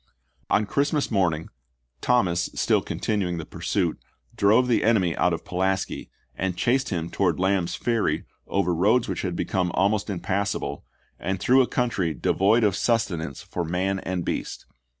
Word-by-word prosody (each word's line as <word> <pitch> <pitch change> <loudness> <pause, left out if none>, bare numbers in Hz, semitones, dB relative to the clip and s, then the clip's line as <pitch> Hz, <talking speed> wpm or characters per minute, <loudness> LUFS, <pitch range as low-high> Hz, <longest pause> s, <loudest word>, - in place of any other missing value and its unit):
On 105 - +3
Christmas 145 +6 0
morn 95 -6 +2
ing 80 - -9 0.5
Thomas, 90 -9 +2
still - - +2
continuing 95 -5 -2
the 80 - -5
pursuit, - - -1 0.4
drove 110 +5 +4
the 120 - +2
enemy 100 -7 +3
out 90 - +2
of 85 - -3
Pulaski, 95 +1 -1 0.2
and 90 -1 -2
chased 130 +2 +1
him 85 -3 -3
towards 90 -4 +1
Lamb's 95 -1 +1
Ferry 115 -3 0 0.2
over 90 - +1
roads 105 +8 +3
which - - -3
had 90 -3 -3
become 90 -1 0
almost 100 +3 +1
impassable 95 -6 -2 0.2
" - - -39
and 95 +1 -2
through 130 +7 +5
a 125 - +2
country 95 -10 0
devoid 100 - +2
of 100 -3 +3
sus 115 +2 +2
tenance 80 -6 -5
for 90 - -4
man 95 +4 -1
and 90 -2 -3
beast." - - -4
95 Hz, 165 wpm, -25 LUFS, 90-110 Hz, 0.5 s, through